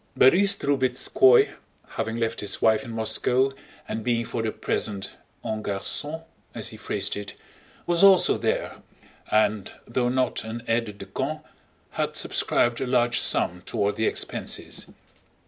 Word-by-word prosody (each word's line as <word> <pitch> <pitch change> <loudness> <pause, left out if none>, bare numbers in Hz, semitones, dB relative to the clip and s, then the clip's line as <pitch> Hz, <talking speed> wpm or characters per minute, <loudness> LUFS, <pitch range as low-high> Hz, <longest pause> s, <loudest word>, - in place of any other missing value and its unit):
Borís 195 +9 +5
Drubetskóy, 130 -2 +4 0.4
having 110 - -3
left 115 -1 -1
his 100 -1 -1
wife 110 +3 +3
in 125 - -9
Moscow 125 +4 +1 0.4
and 110 0 -4
being 115 -1 0
for 115 - -3
the 110 -1 -1
present 100 -3 -3 0.3
en 110 0 -2
garçon 145 +11 -3 0.3
(as - - -3
he - - -11
phrased - - -2
it), 100 -1 -7 0.5
was 175 +1 +2
also 195 -2 +6
there - - -2 0.5
and, 105 -2 +1
though 120 +1 0
not 130 0 0
an 115 +1 -6
aide 115 -3 -1
de 100 - -8
camp, 150 +10 -4 0.5
had - - -2
subscribed 120 -1 +1
a 130 - -1
large 120 -1 +2
sum 90 +1 +2
toward 100 0 -1
the 110 - +1
expenses. - - -3
115 Hz, 145 wpm, -25 LUFS, 110-130 Hz, 0.5 s, also